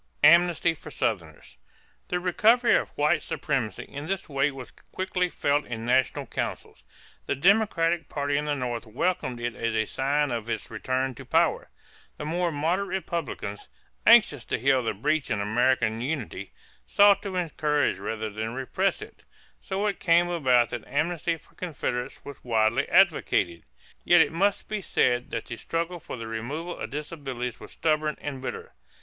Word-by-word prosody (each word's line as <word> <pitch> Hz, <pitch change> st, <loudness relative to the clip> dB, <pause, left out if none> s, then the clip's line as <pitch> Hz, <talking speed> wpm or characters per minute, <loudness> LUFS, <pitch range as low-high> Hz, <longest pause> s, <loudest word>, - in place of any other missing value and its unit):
=Amnesty 170 Hz, +1 st, +5 dB
for 160 Hz, -, -11 dB
Southerners.= -, -, -3 dB, 0.5 s
The 180 Hz, -, -1 dB
recovery 220 Hz, +7 st, +4 dB
of -, -, 0 dB
white 150 Hz, +2 st, +3 dB
supremacy 130 Hz, -7 st, -2 dB
in 145 Hz, +1 st, -8 dB
this 190 Hz, +2 st, -3 dB
way 140 Hz, -1 st, +1 dB
was 135 Hz, -3 st, -9 dB, 0.2 s
quickly 185 Hz, -1 st, -1 dB
felt 145 Hz, -2 st, +1 dB
in 115 Hz, -1 st, -6 dB
national 130 Hz, +1 st, +1 dB
councils. -, -, -5 dB, 0.4 s
The -, -, 0 dB
Democratic 175 Hz, -2 st, +2 dB
party 145 Hz, 0 st, -1 dB
in 145 Hz, +1 st, 0 dB
the 150 Hz, -1 st, 0 dB
North 120 Hz, -3 st, -4 dB
welcomed 130 Hz, +1 st, -1 dB
it 120 Hz, 0 st, -2 dB
as 115 Hz, +1 st, -2 dB
a 110 Hz, 0 st, +2 dB
sign 140 Hz, +4 st, 0 dB
of 115 Hz, -1 st, -3 dB
its 110 Hz, -1 st, -4 dB
return 130 Hz, +3 st, -1 dB
to -, -, -10 dB
power. -, -, +1 dB, 0.5 s
The -, -, -6 dB
more 170 Hz, +2 st, 0 dB
moderate 165 Hz, +7 st, 0 dB, 0.2 s
Republicans, 145 Hz, -, -5 dB, 0.4 s
anxious -, -, +6 dB
to -, -, -1 dB
heal 130 Hz, +1 st, +3 dB
the 115 Hz, -3 st, -2 dB
breach 150 Hz, +8 st, 0 dB
in 110 Hz, -, 0 dB
American 115 Hz, +1 st, +1 dB
unity, 125 Hz, -8 st, -4 dB, 0.4 s
sought 200 Hz, -1 st, +5 dB
to 195 Hz, -2 st, -5 dB
encourage 150 Hz, -, 0 dB
rather 110 Hz, +2 st, -4 dB
than 110 Hz, +2 st, -4 dB
to 115 Hz, -, -4 dB
repress 130 Hz, 0 st, -1 dB
it. -, -, -14 dB, 0.4 s
So 195 Hz, +2 st, -2 dB
it 205 Hz, -2 st, -1 dB
came 175 Hz, -1 st, +3 dB
about 130 Hz, -8 st, +3 dB
that -, -, -5 dB
amnesty 165 Hz, +3 st, -1 dB
for -, -, -25 dB
Confederates 140 Hz, -8 st, -4 dB
was 140 Hz, -1 st, -10 dB
widely 115 Hz, +2 st, +1 dB
advocated. 150 Hz, -, +3 dB, 0.4 s
Yet 175 Hz, -1 st, +6 dB
it 145 Hz, -2 st, +2 dB
must 195 Hz, +5 st, +1 dB
be 215 Hz, -1 st, -3 dB
said 125 Hz, -8 st, +1 dB
that 115 Hz, -, -4 dB
the 120 Hz, -, -7 dB
struggle 170 Hz, +5 st, -3 dB
for 145 Hz, -, -8 dB
the 115 Hz, -, -6 dB
removal 135 Hz, +10 st, -5 dB
of -, -, -4 dB
disabilities 135 Hz, -5 st, -5 dB
was -, -, -11 dB
stubborn 155 Hz, -1 st, 0 dB
and 140 Hz, -3 st, -5 dB
bitter. 130 Hz, -, -6 dB
145 Hz, 165 wpm, -26 LUFS, 120-170 Hz, 0.5 s, anxious